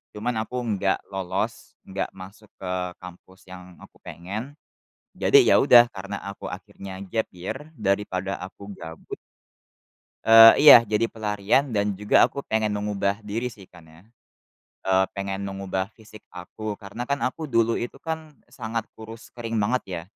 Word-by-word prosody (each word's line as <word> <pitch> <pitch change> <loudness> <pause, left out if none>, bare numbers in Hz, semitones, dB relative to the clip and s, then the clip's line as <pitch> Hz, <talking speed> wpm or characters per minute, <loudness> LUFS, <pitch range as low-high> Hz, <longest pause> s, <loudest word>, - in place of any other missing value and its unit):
Cuman 115 +3 -2
aku 125 +3 -4
nggak 100 -4 0
lolos, 95 -1 -4
nggak 95 0 -4
masuk 95 +3 -13
ke 90 -1 -5 0.3
kampus 90 +1 -14
yang 90 -1 -12
aku - - -18
pengen, 105 +10 -7 0.6
jadi, - - +3
ya, - - +5
udah 120 -3 +8
karena 100 0 -6
aku 100 - -7
akhirnya 95 -1 -9
gap 110 +3 -2
year 90 +7 -5 0.2
daripada 100 -2 -1
aku 100 +2 -9
gabut 80 -3 -9 1.1
Eee, 115 0 +10
iya. 120 -6 +10
Jadi 110 +2 0
pelarian 110 +4 0
dan 100 -1 0
juga 105 +1 +3
aku 140 - -6
pengen 110 -1 0
mengubah 100 -1 -1
diri, 115 +4 -3
sih, 100 -4 -14
kan, 85 -2 -17
ya. 80 +2 -18 0.8
Eee, 95 0 +3
pengen 100 0 -3
mengubah 95 -1 -3
fisik 110 -1 -15
aku 105 +4 -7
karena 100 +5 -8
kan, 140 0 -1
aku 155 +5 -3
dulu 115 -3 +1
itu 120 - -5
kan 160 -2 -5 0.2
sangat 115 0 -4
kurus 110 +1 -12
kering 115 -1 -5
banget, 110 +4 +1
ya. 90 -3 -5
105 Hz, 150 wpm, -24 LUFS, 95-115 Hz, 1.1 s, Eee